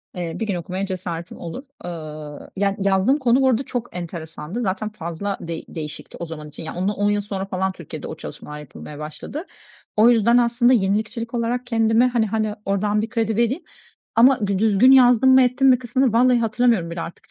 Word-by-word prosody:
Eee, 175 Hz, -2 st, -4 dB
bir 225 Hz, -, -2 dB
gün 195 Hz, -, -1 dB
okumaya 185 Hz, +3 st, -3 dB
cesaretim 175 Hz, -2 st, -5 dB
olur. 170 Hz, +10 st, -7 dB, 0.2 s
Eee, 155 Hz, -3 st, -7 dB
ya, 200 Hz, 0 st, +1 dB
yazdığım 195 Hz, +7 st, +3 dB
konu 255 Hz, -2 st, +3 dB
bu 265 Hz, -, +4 dB
arada 250 Hz, +2 st, +1 dB
çok 240 Hz, -5 st, -5 dB
enteresandı. 170 Hz, +3 st, -6 dB
Zaten 210 Hz, +1 st, -2 dB
fazla 195 Hz, 0 st, -4 dB
değ 165 Hz, -1 st, -5 dB
değişikti 150 Hz, -2 st, -7 dB
o 170 Hz, -, -4 dB
zaman 155 Hz, -2 st, -8 dB
için. 150 Hz, -, -8 dB
Ya, 160 Hz, -, -6 dB
onu 205 Hz, +3 st, 0 dB
yıl 205 Hz, 0 st, +1 dB
sonra 195 Hz, -2 st, -4 dB
falan 190 Hz, 0 st, -1 dB
Türkiye'de 170 Hz, -5 st, -8 dB
o -, -, -6 dB
çalışmalar 150 Hz, 0 st, -8 dB
yapılmaya 150 Hz, +1 st, -10 dB
başladı. 155 Hz, -, -7 dB, 0.5 s
O 225 Hz, +3 st, +7 dB
yüzden 235 Hz, +1 st, +4 dB
aslında 240 Hz, +1 st, +3 dB
yenilikçilik 220 Hz, +3 st, 0 dB
olarak 240 Hz, +1 st, -1 dB
kendime, 225 Hz, +1 st, +3 dB
hani 235 Hz, -3 st, +1 dB
hani, 215 Hz, 0 st, -1 dB
oradan 205 Hz, +2 st, +1 dB
bir 225 Hz, -, -4 dB
kredi 225 Hz, -3 st, -1 dB
vereyim 245 Hz, +8 st, +1 dB, 0.5 s
ama 240 Hz, -2 st, +5 dB
dü 195 Hz, -1 st, 0 dB
düzgün 220 Hz, +4 st, +5 dB
yazdım 250 Hz, -1 st, +6 dB
mı 260 Hz, -, +7 dB
ettim 255 Hz, +2 st, +2 dB
mi 255 Hz, -2 st, +6 dB
kısmını 255 Hz, 0 st, +1 dB
vallahi 245 Hz, +1 st, +4 dB
hatırlamıyorum 225 Hz, -6 st, +1 dB
bile 170 Hz, 0 st, -4 dB
artık.. 170 Hz, -, -9 dB
210 Hz, 190 wpm, -22 LUFS, 175-240 Hz, 0.5 s, O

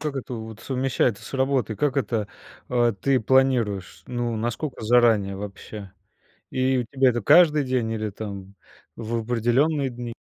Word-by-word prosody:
как 145 Hz, -2 st, -3 dB
это 125 Hz, -1 st, -5 dB
вот 110 Hz, 0 st, -8 dB
совмещается 130 Hz, -4 st, 0 dB
с -, -, -10 dB
работой? 130 Hz, -4 st, 0 dB
Как 145 Hz, +2 st, 0 dB
это, 110 Hz, -4 st, -1 dB, 0.4 s
э, 120 Hz, -2 st, +2 dB
ты 135 Hz, -2 st, +2 dB
планируешь? 120 Hz, -6 st, +1 dB
Ну, 120 Hz, -2 st, -2 dB
насколько 120 Hz, +4 st, -4 dB
заранее 110 Hz, -4 st, +3 dB
вообще? 100 Hz, 0 st, -8 dB, 0.6 s
И 130 Hz, 0 st, +1 dB
у 120 Hz, -, -1 dB
тебя 130 Hz, +1 st, +2 dB
это 120 Hz, 0 st, -2 dB
каждый 155 Hz, -, +5 dB
день, 125 Hz, -3 st, -1 dB
или 110 Hz, -1 st, -3 dB
там 100 Hz, -1 st, -8 dB, 0.4 s
в 115 Hz, +1 st, -3 dB
определенные 125 Hz, +5 st, +1 dB
дни? 120 Hz, -1 st, -7 dB
120 Hz, 150 wpm, -24 LUFS, 110-130 Hz, 0.6 s, каждый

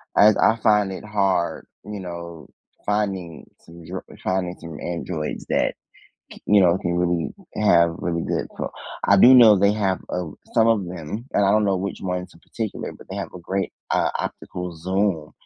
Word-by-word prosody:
I 105 Hz, +1 st, +7 dB
I 110 Hz, -, +4 dB
find 105 Hz, -2 st, +3 dB
it 95 Hz, -, -7 dB
hard, 100 Hz, -5 st, 0 dB, 0.2 s
you 105 Hz, -1 st, -6 dB
know, 85 Hz, -3 st, -8 dB, 0.4 s
finding 95 Hz, -5 st, -2 dB, 0.2 s
some 85 Hz, 0 st, -14 dB
dr 90 Hz, +2 st, -6 dB, 0.2 s
finding 90 Hz, -1 st, -1 dB
some 80 Hz, -2 st, -9 dB
androids 85 Hz, -2 st, -4 dB
that, -, -, +1 dB, 0.6 s
c -, -, -13 dB
you 105 Hz, 0 st, +5 dB
know, 90 Hz, 0 st, +4 dB
can 85 Hz, 0 st, -2 dB
really 85 Hz, -1 st, 0 dB, 0.3 s
have 85 Hz, -5 st, +4 dB
really 85 Hz, -1 st, -2 dB
good -, -, -2 dB
ph -, -, -3 dB, 0.4 s
I 100 Hz, -, +7 dB
do 125 Hz, +7 st, +8 dB
know 110 Hz, -5 st, +8 dB
they 100 Hz, +1 st, +4 dB
have, 100 Hz, -3 st, 0 dB
uh, 90 Hz, -3 st, -3 dB, 0.2 s
some 115 Hz, 0 st, +4 dB
of 110 Hz, -4 st, +2 dB
them, 90 Hz, +5 st, -6 dB
and 100 Hz, -, +3 dB
I 100 Hz, -, +4 dB
don't 105 Hz, +1 st, +3 dB
know 100 Hz, -2 st, +2 dB
which 100 Hz, +2 st, -4 dB
ones 90 Hz, -1 st, -4 dB
in 85 Hz, -, -19 dB
particular, 110 Hz, -3 st, -5 dB
but -, -, -16 dB
they -, -, -5 dB
have -, -, -5 dB
a 90 Hz, -, -8 dB
great, 95 Hz, +3 st, -2 dB, 0.2 s
uh, -, -, +2 dB
optical 90 Hz, -2 st, -5 dB
zoom, 95 Hz, -2 st, -1 dB
95 Hz, 185 wpm, -23 LUFS, 85-105 Hz, 0.6 s, do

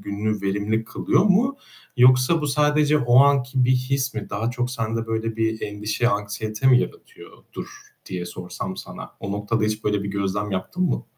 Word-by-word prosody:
gününü 105 Hz, 0 st, -3 dB
verimli 105 Hz, +3 st, -1 dB
kılıyor -, -, +1 dB
mu 235 Hz, +8 st, +3 dB, 0.4 s
yoksa 130 Hz, +6 st, +5 dB
bu 150 Hz, -, -2 dB
sadece 150 Hz, +1 st, +3 dB
o 120 Hz, -2 st, +4 dB
anki 135 Hz, -2 st, +3 dB
bir 130 Hz, -, +2 dB
his 130 Hz, +1 st, -1 dB
mi? 105 Hz, -2 st, -4 dB
Daha 110 Hz, +3 st, -1 dB
çok 125 Hz, 0 st, -2 dB
sende 115 Hz, -1 st, -3 dB
böyle 115 Hz, 0 st, -2 dB
bir 110 Hz, 0 st, -1 dB
endişe, 105 Hz, +3 st, -1 dB
anksiyete 105 Hz, +2 st, -2 dB
mi 125 Hz, -2 st, +6 dB
yaratıyordur -, -, -9 dB, 0.4 s
diye 90 Hz, -1 st, -5 dB
sorsam 90 Hz, +1 st, -6 dB
sana, -, -, -9 dB
o 100 Hz, -, -4 dB
noktada 105 Hz, +2 st, -1 dB
hiç 110 Hz, 0 st, -2 dB
böyle 105 Hz, -1 st, 0 dB
bir 100 Hz, -, -4 dB
gözlem 100 Hz, +1 st, -2 dB
yaptın 95 Hz, -, -3 dB
mı? -, -, -1 dB
115 Hz, 170 wpm, -23 LUFS, 105-130 Hz, 0.4 s, mi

